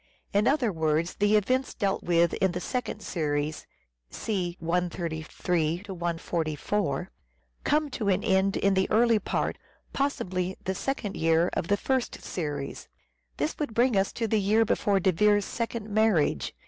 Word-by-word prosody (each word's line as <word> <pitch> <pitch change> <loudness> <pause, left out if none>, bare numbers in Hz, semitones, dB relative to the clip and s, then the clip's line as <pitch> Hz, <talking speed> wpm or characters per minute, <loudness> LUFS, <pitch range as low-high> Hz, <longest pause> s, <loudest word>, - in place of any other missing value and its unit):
In 205 +3 +3
other 265 -5 +2
words, 160 +1 0
the 205 +1 +3
events 255 +6 +1
dealt 195 -1 0
with 170 -1 +2
in 190 -2 +1
the 180 - -2
second 245 0 -3
series 150 -2 -2 0.4
(see 180 -5 -3
133 170 0 -1
144) 170 -1 -2 0.5
come 300 -1 +1
to 215 - -3
an 185 - +2
end 190 +1 +2
in 200 0 +2
the 190 0 +1
early 230 0 +4
part, - - -2 0.3
possibly 185 -10 -1
the 190 - -1
second 210 -1 -3
year, 165 +2 +2
of 165 - -2
the 205 - +2
first 260 +3 -1
series. 145 -5 -4 0.5
This 150 +2 -2
would 290 -8 -3
bring 240 -1 +3
us 195 0 +2
to 230 - -1
the 215 -1 +2
year 215 +3 +3
before 200 -2 +2
De 190 +1 +3
Vere's 205 +3 +3
second 230 -2 -3
marriage. 215 -7 +2
190 Hz, 150 wpm, -27 LUFS, 170-215 Hz, 0.5 s, early